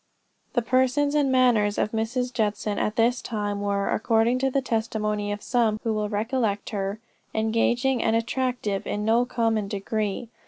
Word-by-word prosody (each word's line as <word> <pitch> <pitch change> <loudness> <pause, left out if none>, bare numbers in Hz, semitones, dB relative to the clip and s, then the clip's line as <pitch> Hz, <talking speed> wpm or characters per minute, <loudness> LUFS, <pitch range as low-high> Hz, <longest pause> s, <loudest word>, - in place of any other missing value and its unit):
The 240 - +1
person 260 +4 +2
and 285 -3 +2
manners 235 -5 +3
of 215 - 0
Mrs. 245 +3 -2
Judson 210 -2 -1
at 210 - -1
this 235 +2 +2
time, 205 -3 -3
were, 200 -1 0
according 225 +3 +2
to 270 +1 +1
the 275 - +1
testimony 215 -4 -1
of 205 0 -5
some 225 -4 +1
who 225 - 0
well 210 -1 -1
recollect 215 -1 -1
her, 200 0 -3 0.4
engaging 235 +4 +1
and 225 - +2
attractive 230 -3 -1
in 210 0 -2
no 230 +2 +3
common 225 -4 0
degree. 210 +2 -3
225 Hz, 160 wpm, -25 LUFS, 210-245 Hz, 0.4 s, manners